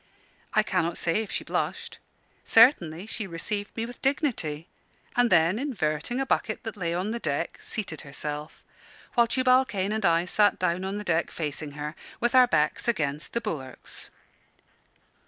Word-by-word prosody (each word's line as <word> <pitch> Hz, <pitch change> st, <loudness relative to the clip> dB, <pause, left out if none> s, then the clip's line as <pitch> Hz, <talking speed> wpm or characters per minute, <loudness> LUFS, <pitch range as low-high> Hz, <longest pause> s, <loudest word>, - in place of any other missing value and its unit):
I -, -, +5 dB
cannot 170 Hz, +1 st, 0 dB
say 170 Hz, +6 st, +1 dB
if 215 Hz, -, -6 dB
she -, -, -2 dB
blushed. -, -, -3 dB, 0.4 s
Certainly 195 Hz, -, +5 dB
she 220 Hz, -1 st, -5 dB
received 205 Hz, +5 st, -3 dB
me 225 Hz, -, -1 dB
with 245 Hz, +1 st, -10 dB
dignity: 220 Hz, -, -1 dB, 0.5 s
and 245 Hz, -1 st, +4 dB
then, 170 Hz, +3 st, +4 dB
inverting 225 Hz, -, -1 dB
a 270 Hz, -, 0 dB
bucket 220 Hz, -4 st, 0 dB
that 225 Hz, -1 st, -5 dB
lay 175 Hz, -5 st, -2 dB
on 180 Hz, +5 st, -1 dB
the 235 Hz, -, -3 dB
deck, 155 Hz, -2 st, -2 dB
seated 190 Hz, -9 st, -4 dB
herself; 150 Hz, +2 st, -6 dB, 0.5 s
while 235 Hz, -1 st, +4 dB
Tubal 255 Hz, +2 st, +4 dB
Cain 205 Hz, -5 st, -2 dB
and 220 Hz, 0 st, -1 dB
I 170 Hz, -1 st, +3 dB
sat 205 Hz, +2 st, +3 dB
down 180 Hz, 0 st, 0 dB
on 195 Hz, +2 st, -2 dB
the 210 Hz, -, -4 dB
deck 170 Hz, -4 st, +1 dB
facing 150 Hz, -2 st, -4 dB
her, 150 Hz, +1 st, -5 dB, 0.3 s
with 240 Hz, 0 st, +1 dB
our 255 Hz, -1 st, +7 dB
backs 150 Hz, -1 st, +1 dB
against 150 Hz, -9 st, -1 dB
the 235 Hz, -, 0 dB
bulwarks. 140 Hz, -, -6 dB
190 Hz, 165 wpm, -27 LUFS, 160-230 Hz, 0.5 s, our